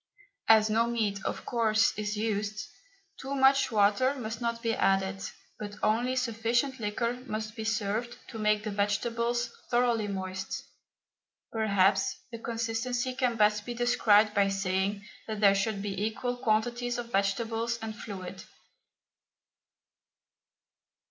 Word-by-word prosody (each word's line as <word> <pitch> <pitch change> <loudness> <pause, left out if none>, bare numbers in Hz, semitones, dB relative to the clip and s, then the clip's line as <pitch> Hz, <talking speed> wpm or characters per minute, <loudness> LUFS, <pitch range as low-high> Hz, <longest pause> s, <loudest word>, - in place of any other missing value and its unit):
As 220 -1 +6
no 225 +2 +2
meat, 215 -4 -1
of - - -3
course, 225 -2 +2
is 210 0 -3
used, 215 -1 -2 0.5
too 270 +1 -4
much 270 0 +4
water 215 +6 +3
must 225 -3 -5
not 235 0 -2
be 230 -1 +1
added, 195 -1 +1 0.4
but 205 -1 -6
only 240 +4 +2
sufficient 240 +2 0
liquor 235 +3 -2
must 215 0 -4
be 220 - -5
served 220 +2 -1
to 225 - -7
make 210 0 +2
the 215 - -3
vegetables 235 +4 0 0.2
thoroughly 240 -3 +2
moist. 190 -1 -4 0.9
Perhaps 200 -3 +2 0.2
the 230 - -6
consistency 235 +2 -2
can 250 -2 0
best 210 -1 +3
be 240 +2 -5
described 225 -3 +4
by 200 -1 +3
saying 195 +1 -1 0.2
that 215 -1 -4
there 200 -2 +6
should 200 0 -1
be 200 -1 -3
equal 245 +3 -2
quantities 240 +1 0
of 235 -1 -6
vegetables 225 +4 0
and 220 -1 -5
fluid. 190 -4 -7
220 Hz, 130 wpm, -29 LUFS, 205-235 Hz, 0.9 s, As